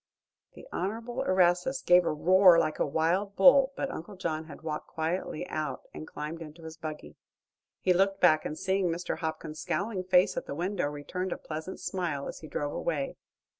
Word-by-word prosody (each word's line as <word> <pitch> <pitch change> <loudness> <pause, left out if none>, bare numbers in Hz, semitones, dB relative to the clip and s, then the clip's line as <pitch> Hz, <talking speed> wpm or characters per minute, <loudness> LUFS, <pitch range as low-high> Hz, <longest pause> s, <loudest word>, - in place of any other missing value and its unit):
The - - -12
Honorable 230 +6 -3
Erastus 185 +8 +2
gave 175 0 +6
a - - +2
roar 180 +3 +6
like 155 -2 +1
a - - +3
wild 175 +7 0
bull, 270 +5 +7
but 275 - -2
Uncle 195 +1 -7
John 160 -4 -3
had 155 0 -12
walked 155 -1 -4
quietly 160 0 -3
out 150 -4 -3
and 155 - -8
climbed 155 +3 -6
into 160 +1 -10
his 160 0 -8
buggy. 155 - -8 0.6
He 185 - +4
looked 195 +2 +2
back, 155 -4 +5
and 155 - -4
seeing 190 -1 +1
Mr. 170 +1 -3
Hopkins's 155 -1 -4
scowling 200 -2 -2
face 180 0 +4
at - - -3
the - - -4
window 180 0 -1
returned 150 +6 -4
a - - -2
pleasant 160 +4 -6
smile 165 -7 -3
as - - -7
he 155 - -10
drove 145 -1 -3
away. 145 -5 -1
Mr. - - -19
175 Hz, 190 wpm, -29 LUFS, 155-190 Hz, 0.6 s, bull